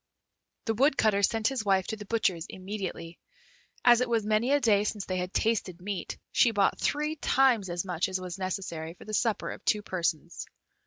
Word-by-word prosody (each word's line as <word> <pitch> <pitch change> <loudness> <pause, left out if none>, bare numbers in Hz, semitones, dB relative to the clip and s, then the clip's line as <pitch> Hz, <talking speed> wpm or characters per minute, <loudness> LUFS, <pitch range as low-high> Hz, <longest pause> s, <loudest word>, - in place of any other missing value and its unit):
The 225 - +1
Woodcutter 220 -5 +3
sent 220 +2 +2
his 265 -5 -2
wife 195 -2 +2
to 220 - -2
the 210 -1 -9
butcher's 185 -7 0
immediately. 185 -3 -6 0.7
As 240 0 +7
it 250 - 0
was 225 -3 +1
many 215 +4 +1
a 290 - +4
day 210 -6 +3
since 210 -1 -3
they 185 - -2
had 180 0 -3
tasted 200 -6 0
meat, 190 -1 -5
she 240 - +4
bought 200 -3 +1
three 300 +2 -1
times 255 -9 +3
as 175 +2 -2
much 180 +1 -1
as 185 0 -2
was 185 0 -6
necessary 175 -4 -4
for - - -14
the 215 - -7
supper 225 0 0
of - - -9
two 210 -1 +1
persons. 170 -3 -3
205 Hz, 195 wpm, -28 LUFS, 185-225 Hz, 0.7 s, As